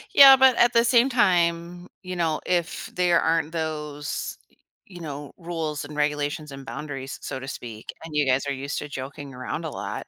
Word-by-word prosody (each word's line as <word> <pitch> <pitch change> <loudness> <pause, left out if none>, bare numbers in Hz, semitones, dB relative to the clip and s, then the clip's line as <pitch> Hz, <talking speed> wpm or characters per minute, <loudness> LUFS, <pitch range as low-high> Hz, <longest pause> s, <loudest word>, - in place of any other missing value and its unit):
Yeah, 275 -1 +11
but 265 -1 +6
at 240 0 +4
the 230 0 +5
same 240 +1 +5
time, 175 -6 +1
you 185 -1 -6
know, 165 -3 0
if 175 -2 -1
there 175 -2 +3
aren't 160 -1 +1
those, 150 -3 -4
y - - -30 0.3
you 180 -3 -11
know, 145 -2 -7
rules 165 -4 -4
and 150 +1 -9
regulations 150 0 -1
and 135 0 -9
boundaries, 135 -1 -6
s - - -10
so 135 - -4
to 135 - -8
speak, 115 -4 -7
and 160 -2 -8
you 150 -1 +3
guys 130 +1 +2
are 140 - 0
used 140 +2 -4
to 150 - -7
joking 135 0 -7
around 130 +6 -4
a - - -2
lot, - - -6
155 Hz, 205 wpm, -25 LUFS, 145-175 Hz, 0.3 s, Yeah